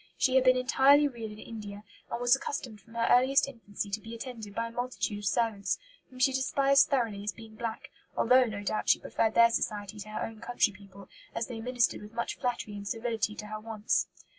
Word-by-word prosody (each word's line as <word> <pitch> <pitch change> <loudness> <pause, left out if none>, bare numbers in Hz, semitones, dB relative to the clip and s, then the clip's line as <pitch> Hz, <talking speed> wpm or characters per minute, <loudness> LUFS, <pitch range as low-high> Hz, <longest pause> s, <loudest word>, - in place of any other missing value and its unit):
She 255 - +2
had 265 -1 +5
been 255 0 +6
entirely 275 +3 +5
reared 230 -5 -6
in - - -12
India, 210 -2 -8 0.3
and 235 - -3
was 245 +1 +5
accustomed 255 -6 -5
from 225 +4 -18
her 230 0 +1
earliest 260 +3 +5
infancy 210 -5 -6
to 210 +2 -2
be 225 +2 -8
attended 225 -4 -8
by 230 0 -1
a - - -13
multitude 245 -3 -3
of 205 - -7
servants, 215 -2 0 0.3
whom 255 - -14
she 265 +1 +3
despised 275 +1 +4
thoroughly 230 -8 0
as 210 - -1
being 225 -1 -12
black, 230 0 -5 0.3
although, 255 +2 +5
no 210 -3 -5
doubt, 215 +1 -1
she - - +6
preferred 220 -1 0
their 235 0 +7
society 210 -2 -2
to 215 - -8
her 215 - -3
own 225 -1 -9
country 235 -2 +1
people, 195 0 -14 0.3
as 230 - -1
they 225 -2 -6
ministered 245 0 +1
with 210 +1 -11
much 235 0 -3
flattery 245 -5 -2
and 200 0 -7
servility 225 -1 -1
to 210 - -7
her 215 0 -6
wants. 215 -1 0
230 Hz, 215 wpm, -30 LUFS, 210-250 Hz, 0.3 s, their